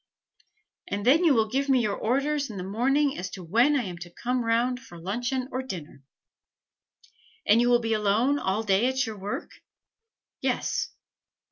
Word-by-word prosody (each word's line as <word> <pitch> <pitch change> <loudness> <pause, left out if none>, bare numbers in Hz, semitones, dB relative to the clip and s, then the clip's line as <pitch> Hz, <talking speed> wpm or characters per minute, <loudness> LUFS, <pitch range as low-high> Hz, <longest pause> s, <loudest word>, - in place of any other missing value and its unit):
And 200 0 -3
then 300 +8 +5
you 315 -6 +5
will 220 -1 +3
give 275 +5 -1
me 260 -2 +4
your 210 -3 0
orders 280 +4 0
in 210 - -7
the 180 - -4
morning 270 +9 +1
as 185 +1 -4
to 185 - -8
when 235 - +3
I 265 - +1
am 180 -4 -6
to 175 0 -8
come 245 +7 -2
round 235 +2 +1
for 175 -8 -13
luncheon 245 +8 -2
or 255 - -2
dinner." 170 - -8 1.4
"And 225 +3 +5
you 240 - +3
will 240 0 +4
be 225 -1 0
alone 220 +7 +2
all 195 +1 -1
day 205 +3 +3
at 260 +1 +1
your 220 -3 -7
work?" 230 - -5 0.9
"Yes." - - -1
235 Hz, 175 wpm, -26 LUFS, 200-260 Hz, 1.4 s, then